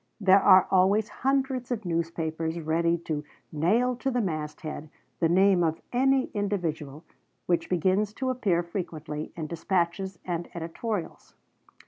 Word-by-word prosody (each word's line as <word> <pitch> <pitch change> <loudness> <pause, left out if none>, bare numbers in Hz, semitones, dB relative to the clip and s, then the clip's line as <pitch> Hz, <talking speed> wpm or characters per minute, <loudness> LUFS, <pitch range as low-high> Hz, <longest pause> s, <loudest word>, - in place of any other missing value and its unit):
There 195 -1 +5
are 185 -1 +7
always 195 +4 +3
hundreds 265 -2 0
of 225 -5 -3
newspapers 165 -1 -2
ready 170 +2 +1
to 150 -2 -2 0.3
"nail 215 +11 +2
to 270 - -1
the 250 -1 0
mast 155 -7 -3
head" 155 -1 -6 0.3
the 165 - +2
name 185 0 +4
of 160 -1 0
any 265 +1 +2
individual 165 -8 -3 0.4
which 170 -2 0
begins 190 +4 +1
to 260 +2 -1
appear 195 -9 +1
frequently 165 -4 -5
in 160 - -4
dispatches 175 +3 -1
and 175 -1 -3
editorials. 170 +2 -5
175 Hz, 135 wpm, -27 LUFS, 165-210 Hz, 0.4 s, are